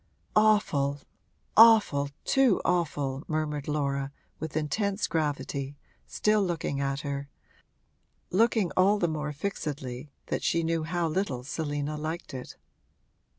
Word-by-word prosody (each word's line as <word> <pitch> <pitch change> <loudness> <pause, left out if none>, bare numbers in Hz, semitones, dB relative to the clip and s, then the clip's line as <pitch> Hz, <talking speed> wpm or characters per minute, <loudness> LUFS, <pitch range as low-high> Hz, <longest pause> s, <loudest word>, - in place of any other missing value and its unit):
'Awful, 185 -10 +3 0.6
awful, 215 -11 +6 0.2
too 270 -7 +4
awful,' 145 -6 0
murmured 155 -3 -2
Laura, 140 -2 -1 0.3
with 160 0 -4
intense 200 +7 0
gravity, 145 -3 -2 0.3
still 210 -1 +2
looking 165 -6 -2
at 140 0 -1
her 140 -1 -4 1.0
looking 215 0 +3
all 195 +3 +4
the 175 - +1
more 150 -2 -3
fixedly 145 -5 -4 0.2
that - - -2
she 170 0 +1
knew 165 0 0
how 170 +1 0
little 155 -7 -2
Selina 145 +1 -3
liked 160 +1 -5
it. 130 -1 -7
155 Hz, 115 wpm, -28 LUFS, 140-185 Hz, 1.0 s, awful